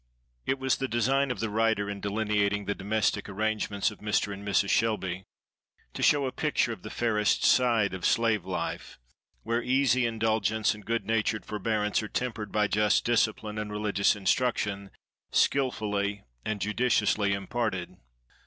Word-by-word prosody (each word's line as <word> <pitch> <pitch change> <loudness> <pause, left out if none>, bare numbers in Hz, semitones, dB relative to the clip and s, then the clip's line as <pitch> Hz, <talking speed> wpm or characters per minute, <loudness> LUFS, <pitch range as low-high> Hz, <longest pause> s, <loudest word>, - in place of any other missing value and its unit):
It 135 - +1
was 130 -1 0
the 135 - -2
design 135 +4 +1
of 125 - -3
the 110 - -1
writer, 110 -1 +1
in 100 -1 -5
delineating 105 -1 0
the 100 - -1
domestic 105 +1 -1
arrangements 105 0 -1
of - - -13
Mr. 105 -1 0
and 100 +1 -9
Mrs. 100 -1 +1
Shelby, 95 -5 0 0.7
to - - -6
show 145 -2 +4
a 130 - -2
picture 145 -6 0
of 100 - -11
the 105 - -8
fairest 105 -3 +1
side 115 -6 +3
of 95 - -6
slave 110 -4 +2
life, - - -4 0.5
where 115 +2 0
easy 130 -1 +2
indulgence 110 -1 +1
and 105 -1 -12
good 115 -3 -1
natured 110 0 0
forbearance 105 0 -1
are 110 - -5
tempered 110 -3 -3
by 105 0 +2
just 105 +1 +2
discipline 110 -2 0
and 105 -1 -4
religious 105 -1 +1
instruction, 100 -1 0 0.4
skilfully 105 -7 0 0.2
and 110 -2 -3
judiciously 105 -1 +1
imparted. 100 -3 -3
110 Hz, 155 wpm, -28 LUFS, 100-115 Hz, 0.7 s, show